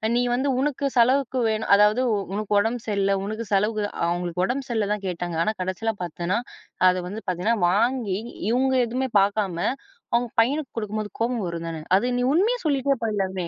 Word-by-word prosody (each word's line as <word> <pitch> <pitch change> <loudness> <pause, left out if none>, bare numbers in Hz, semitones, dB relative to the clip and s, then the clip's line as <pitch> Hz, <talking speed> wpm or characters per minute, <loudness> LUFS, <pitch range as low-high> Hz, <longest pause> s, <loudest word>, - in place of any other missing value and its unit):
நீ 245 - +3
வந்து 265 +3 0
உனக்கு 280 -1 0
செலவுக்கு 255 +1 +3
வேணும். 220 0 -2
அதாவது 210 +5 +4 0.3
உனக்கு 210 0 0
உடம்பு 225 +2 -1
சரியில்ல, 200 -1 +1
உனக்கு 215 +2 -4
செலவுக்கு 210 +2 +1 0.2
அவுங்களுக்கு 175 +1 -1
உடம்பு 265 +4 -3
சரியில்ல 220 -3 0
தான் 205 -2 -5
கேட்டாங்க. 175 -2 -3
ஆனா 215 - 0
கடைசியில 205 +5 -2
பார்த்தன்னா, 175 +5 -2 0.5
அத 180 - +2
வந்து 215 +3 -6
பார்த்தீங்கன்னா, 185 +6 0
வாங்கி 220 -1 +1 0.3
இவுங்க 260 +2 +2
எதுவுமே 260 +2 -2
பார்க்காம, 200 -3 0 0.6
அவுங்க 240 0 +2
பையனுக்கு 280 +5 -1
குடுக்கும்போது 215 -1 -3
கோபம் 230 -4 0
வரும் 170 0 -5
தானே. 160 -1 -5 0.2
அது 245 +4 0
நீ - - +1
உண்மைய 450 +9 +2
சொல்லிட்டே 275 -3 +1
போயிரலாமே! 190 -4 -2
215 Hz, 165 wpm, -24 LUFS, 195-250 Hz, 0.6 s, அதாவது